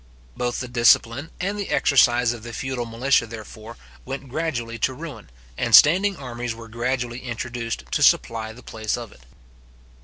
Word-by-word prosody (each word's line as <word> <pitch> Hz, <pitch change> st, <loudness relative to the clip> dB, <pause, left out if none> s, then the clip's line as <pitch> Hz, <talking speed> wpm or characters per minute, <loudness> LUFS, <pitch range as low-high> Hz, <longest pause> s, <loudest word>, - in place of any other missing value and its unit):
Both 120 Hz, +1 st, -2 dB
the 125 Hz, -, -5 dB
discipline 120 Hz, +3 st, +3 dB
and 195 Hz, +3 st, -2 dB
the 200 Hz, -, -4 dB
exercise 120 Hz, -3 st, +4 dB
of 120 Hz, -, -9 dB
the 120 Hz, +1 st, -9 dB
feudal 130 Hz, -2 st, -3 dB
militia, 115 Hz, +1 st, +1 dB
therefore, 110 Hz, 0 st, -10 dB, 0.3 s
went 135 Hz, -, -7 dB
gradually 120 Hz, -6 st, -3 dB
to 130 Hz, +4 st, 0 dB
ruin, 140 Hz, -, -9 dB, 0.3 s
and -, -, +5 dB
standing 190 Hz, +5 st, +6 dB
armies 120 Hz, -3 st, -5 dB
were 115 Hz, 0 st, -11 dB
gradually 120 Hz, +1 st, -2 dB
introduced 120 Hz, -, -5 dB
to -, -, 0 dB
supply 110 Hz, -1 st, +3 dB
the 120 Hz, +3 st, -14 dB
place 110 Hz, 0 st, -3 dB
of 120 Hz, -3 st, -8 dB
it. -, -, -18 dB
120 Hz, 160 wpm, -23 LUFS, 115-130 Hz, 0.3 s, standing